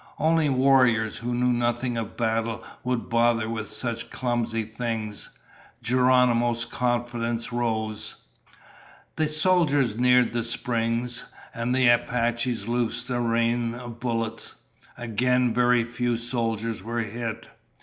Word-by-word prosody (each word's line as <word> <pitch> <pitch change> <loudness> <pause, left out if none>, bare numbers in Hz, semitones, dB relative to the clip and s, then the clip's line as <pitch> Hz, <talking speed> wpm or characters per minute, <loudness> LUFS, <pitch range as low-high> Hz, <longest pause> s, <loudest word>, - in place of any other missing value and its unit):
Only 160 -1 +2
warriors 130 -5 +3
who 120 +1 -3
knew 125 0 +2
nothing 120 +1 0
of 115 -2 -5
battle 115 -1 -1 0.2
would 125 -2 -2
bother 115 -1 +2
with 110 -2 -4
such 115 +2 -3
clumsy 120 -3 -1
things. 110 -1 -3 0.5
Geronimo's 125 -2 +3
confidence 120 -1 -2
rose. 110 -3 -2 1.0
The 155 -1 +1
soldiers 155 - +3
neared 125 -1 +4
the 120 -1 0
springs, 120 0 -1 0.3
and 120 +2 -1
the 130 -1 +4
Apaches 120 -1 +1
loosed 120 +1 -1
a 120 - 0
rain 115 0 +1
of 120 -1 -9
bullets. 115 -2 -2 0.4
Again, 125 +1 +1
very 120 0 +3
few 120 0 -1
soldiers 115 -2 -2
were 115 +1 -2
hit. 115 +1 -5
120 Hz, 120 wpm, -25 LUFS, 115-125 Hz, 1.0 s, neared